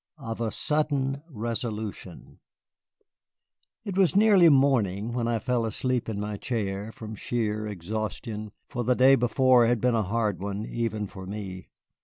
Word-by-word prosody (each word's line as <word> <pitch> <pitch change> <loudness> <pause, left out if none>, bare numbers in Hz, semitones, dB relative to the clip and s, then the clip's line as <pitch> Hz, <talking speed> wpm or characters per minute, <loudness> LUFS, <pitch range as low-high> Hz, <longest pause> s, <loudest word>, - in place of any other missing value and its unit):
OF 115 -5 -6
A 115 - 0
SUDDEN 145 -2 0
RESOLUTION 110 - -5 1.4
It 200 -4 -5
was 190 -1 +3
nearly 200 -5 +6
morning 120 -7 +2
when 120 -1 -1
I 115 -1 +1
fell 125 +1 0
asleep 125 +1 -1
in 105 -2 -3
my 105 0 -3
chair, 105 -2 -3
from 110 0 -8
sheer 110 -1 -2
exhaustion, 105 +2 -5 0.2
for 120 -3 -3
the 125 +2 +2
day 130 +2 +6
before 125 -1 +4
had 120 0 +2
been 125 +2 +2
a 115 - +2
hard 105 -1 -1
one, 100 +1 -3
even 115 -3 -2
for 95 -1 -9
me. 95 -3 -6
115 Hz, 150 wpm, -27 LUFS, 105-130 Hz, 1.4 s, nearly